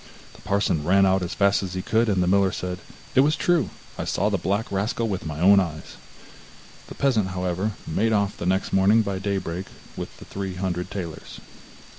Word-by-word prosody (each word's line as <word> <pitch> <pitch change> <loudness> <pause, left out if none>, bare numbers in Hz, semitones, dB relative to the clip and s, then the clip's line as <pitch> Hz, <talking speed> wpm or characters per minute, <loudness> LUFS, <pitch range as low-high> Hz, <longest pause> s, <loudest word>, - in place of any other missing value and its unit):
The - - -16
parson 100 -6 0
ran 95 +4 +4
out 95 0 +3
as 90 -1 -4
fast 100 0 +3
as 95 -2 -5
he 95 - -3
could, 110 +1 +2
and 95 -3 +2
the - - 0
miller 95 0 +3
said: 90 0 -4 0.3
'It - - +4
was 150 +3 +4
true; 175 -2 +1 0.3
I - - -1
saw 100 +3 0
the 100 - 0
black 100 +6 -1
rascal 105 +4 -1
with 95 -6 -3
my 75 -1 -5
own 100 +3 +7
eyes.' 85 -5 -4 0.9
The - - -10
peasant, 120 -8 +2
however, 95 +2 -2
made 110 +8 0
off 100 -2 0
next 95 +3 0
morning 100 +4 +5
by 100 -2 -3
daybreak 95 -2 -3 0.3
with - - -7
the - - -12
three 95 -2 -5
hundred 90 -1 -3
talers. 85 -6 -7
95 Hz, 195 wpm, -24 LUFS, 90-100 Hz, 0.9 s, own